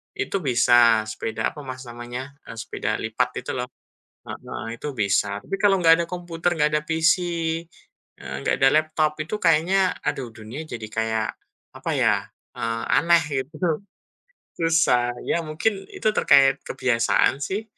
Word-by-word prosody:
itu 405 - -2
bisa. 120 -5 +4
Sepeda 110 +1 -3
apa, 150 - -11
Mas, 130 0 -6
namanya? 120 +2 -7 0.2
E - - -8
sepeda 115 - -3
lipat 115 +3 -2
itu, - - -4
lo. 125 0 -3 0.6
Heeh, - - -7 0.2
itu 150 - -3
bisa. 100 0 +1
Tapi 105 - -10
kalau 200 -2 +4
nggak 165 -1 +5
ada - - -2
komputer, 175 -1 -2
nggak 150 - +4
ada 150 - +2
PC, 160 +1 +3 1.0
eee, 65 -1 -7
nggak - - +2
ada 135 - +6
laptop, 155 0 +1
itu 210 +7 -4
kayaknya, 180 +3 +3
aduh. 130 -3 -2
Dunia 115 +8 -8
jadi 115 -5 -7
kayak, 110 0 -1 0.5
apa - - -3
ya, - - +2 0.3
eee, 115 -1 -2
aneh 170 0 +4 0.2
gitu. 155 +3 -2 0.8
Susah. 155 -7 +3 0.2
Ya 170 - +1
mungkin, 195 +6 -1
itu 215 - -1
terkait 135 -8 +5
kebiasaan, 130 +1 +1
sih. 195 +9 -2
140 Hz, 150 wpm, -23 LUFS, 120-165 Hz, 1.0 s, ada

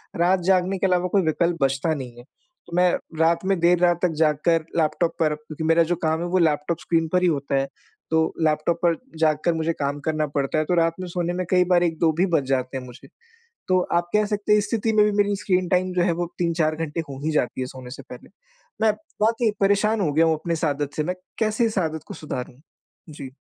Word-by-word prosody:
रात 180 +2 +2
जागने 185 +1 +1
के 190 - +1
अलावा 180 0 +1
कोई 195 - +5
विकल्प 170 +2 +1
बचता 135 +4 +1
नहीं 125 -4 -7
है। 120 - -12 0.4
तो 170 - -7
मैं 180 -1 +4 0.3
रात 165 +2 +2
में 195 -2 +1
देर 175 +1 +4
रात 175 -1 +3
तक 180 -2 +2
जाग 155 -2 +3
कर 165 -2 +3
लैपटॉप 165 +1 +1
पर 155 -2 +2
क्योंकि 155 +1 -8
मेरा 165 +1 +4
जो 175 +2 -1
काम 160 0 +1
है - - -2
वो - - +4
लैपटॉप 155 0 +1
स्क्रीन 165 -1 0
पर 180 - +3
ही 180 - +3
होता 140 -3 -1
है। 135 0 +1 0.4
तो 160 0 +3 0.2
लैपटॉप 155 +2 +1
पर 170 -1 +3 0.2
जाग 155 -2 +3
कर 170 - +3
मुझे 160 +1 -1
काम 145 -1 -3
करना 155 -1 0
पड़ता 140 +2 0
है। 155 - +1
तो 180 - -1
रात 165 -1 +2
में 185 - -5
सोने 175 0 -2
में 180 0 -2
कई 180 -1 +5
बार 175 -1 +3
1-2 165 -1 +1
भी 185 - +4
बज 140 - +1
जाते 130 0 -1
हैं 130 - -6
मुझे। 125 -1 -13 0.6
तो 185 0 +3 0.2
आप 175 0 -1
कह 210 0 +3
सकते 210 0 -2
हैं 210 - +6
इस 205 - -2
स्थिति 225 -1 0
में 210 - +5
भी 210 - +2
मेरी 205 0 +2
स्क्रीन 185 -3 0
टाइम 185 0 +1
जो 180 - +1
है 175 - +2
वो - - 0
3-4 165 -2 +1
घंटे 165 0 -4
हो 135 - -7
ही 160 - +1
जाती 130 -3 -1
है 130 - -2
सोने 130 -1 -10
से - - -9
पहले। - - -11 0.5
मैं 220 -1 +4 0.3
बहुत 225 +2 +2
ही 220 -3 +3
परेशान 205 +2 +2
हो 155 -5 +1
गया 165 +2 +4
हूँ 160 - +3
अपने 170 - -2
इस 160 0 -1
आदत 145 -1 -2
से। 155 - +1
मैं 180 +4 -2 0.2
कैसे 220 +1 +1
इस 220 -2 -2
आदत 160 -3 -2
को - - -7
सुधारूँ? 125 -3 -7 0.5
जी। 140 -3 -8
165 Hz, 250 wpm, -23 LUFS, 155-180 Hz, 0.6 s, हैं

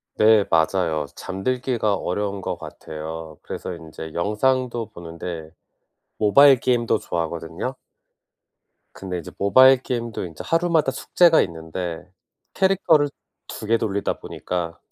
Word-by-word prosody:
네, 105 -2 +5
맞아요. 80 -2 +1
잠들기가 115 +2 -1
어려운 100 +1 -3
것 - - -3
같아요. 80 +1 -8
그래서 95 - -6
인제 80 -1 -9
영상도 120 +4 0
보는데 85 -1 -7 0.7
모바일 135 +5 +6
게임도 120 -3 +1
좋아하거든요. 85 +8 -4 1.2
근데 95 -2 -5
이제 85 - -9
모바일 130 +6 +6
게임도 115 -6 -3
인제 80 -3 -8
하루마다 165 -4 +2
숙제가 165 +4 +4
있는데 85 +1 -5 0.4
캐릭터를 175 -6 +3 0.4
2 - - -7
개 115 +2 +3
돌리다 100 -3 -2
보니까 85 -2 -4
100 Hz, 285 characters per minute, -23 LUFS, 85-130 Hz, 1.2 s, 모바일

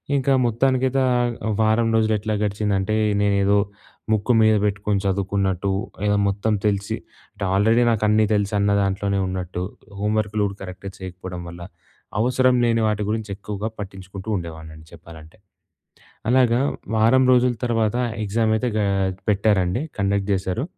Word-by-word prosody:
ఇంకా 135 0 +2
మొత్తానికైతే 130 +3 +1
ఆహ్, 120 -1 +1 0.3
వారం 110 +1 +3
రోజులెట్లా 110 -1 +1
గడిచిందంటే, 100 -1 -1 0.3
నేనేదో 100 0 +3 0.5
ముక్కు 110 +3 +2
మీద 110 0 +5
బెట్టుకొని 105 -1 0
చదువుకున్నట్టు, 95 0 0 0.3
ఏదో 105 0 +2
మొత్తం 100 +2 0
తెలిసి 100 -1 0 0.4
అంటే 105 - -7
ఆల్రెడీ 110 +5 +4
నాకన్నీ 110 -1 +3
తెలుసన్న 100 0 +1
దాంట్లోనే 100 0 0
ఉన్నట్టు, 90 -1 -4 0.4
హోంవర్క్‌లు 105 0 0
గూడా 100 -1 -3
కరెక్ట్‌గా 95 +1 -7
చేయకపోవడం 90 -1 -7
వల్ల, 85 0 -10 0.6
అవసరం 125 +2 +3
లేని 115 -1 +2
వాటి 105 -1 0
గురించి 110 -1 -2
ఎక్కువగా 105 +1 -5
పట్టించుకుంటూ 95 +1 -8
ఉండేవాడినండి 80 -2 -7
చెప్పాలంటే. 80 -1 -14 0.9
అలాగా 125 -1 +4 0.4
వారం 115 +4 +4
రోజుల 125 0 +4
తర్వాత 115 -2 +1 0.3
ఎగ్జామయితే 110 +3 +1
గా 105 - +1 0.4
పెట్టారండి. 100 0 +2 0.2
కండక్ట్ 100 0 0
జేశారు. 95 +5 -1
105 Hz, 120 wpm, -22 LUFS, 95-110 Hz, 0.9 s, మీద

